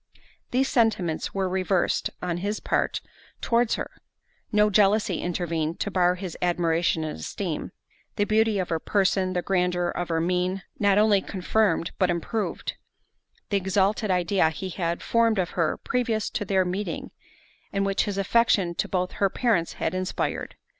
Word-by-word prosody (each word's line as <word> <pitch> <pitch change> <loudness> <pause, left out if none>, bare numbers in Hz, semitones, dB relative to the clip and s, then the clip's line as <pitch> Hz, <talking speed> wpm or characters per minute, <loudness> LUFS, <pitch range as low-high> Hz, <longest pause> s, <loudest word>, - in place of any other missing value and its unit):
These 265 +2 +2
sentiments 210 -11 +1
were 190 -1 +1
reversed 185 0 0
on 175 -1 -1
his 205 +4 -2
part - - 0 0.4
towards 235 -1 +2
her—no 210 - -3
jealousy 205 +1 +3
intervened 170 -2 -2
to 205 - -1
bar 180 -1 +3
his 180 -2 -6
admiration 170 -2 +1
and 155 - -5
esteem—the 140 - -5
beauty 215 0 +2
of 185 -2 -2
her 165 - 0
person, 190 0 +1
and 175 - -2
grandeur 180 -2 +1
of 175 0 -3
her 165 -1 +1
mien, 180 +3 0 0.2
not 200 -1 +4
only 210 -2 +4
confirmed, 185 -2 0
but 185 -2 +3
improved, 180 +6 -2 0.7
the 200 - +2
exalted 195 +3 +1
idea 180 -1 +2
he 175 +4 -5
had 170 -1 -2
formed 230 -2 +2
of 180 -2 0
her 165 -3 0
previous 235 -4 -1
to 230 -4 -2
their 190 -1 +2
meeting, 190 +3 -3 0.6
and 195 0 0
which 195 0 +1
his 205 -2 -3
affection 195 -3 +2
to - - -2
both 180 -1 -1
her 195 - +1
parents 210 -7 +1
had - - -2
inspired. 185 0 -2
190 Hz, 155 wpm, -26 LUFS, 175-210 Hz, 0.7 s, not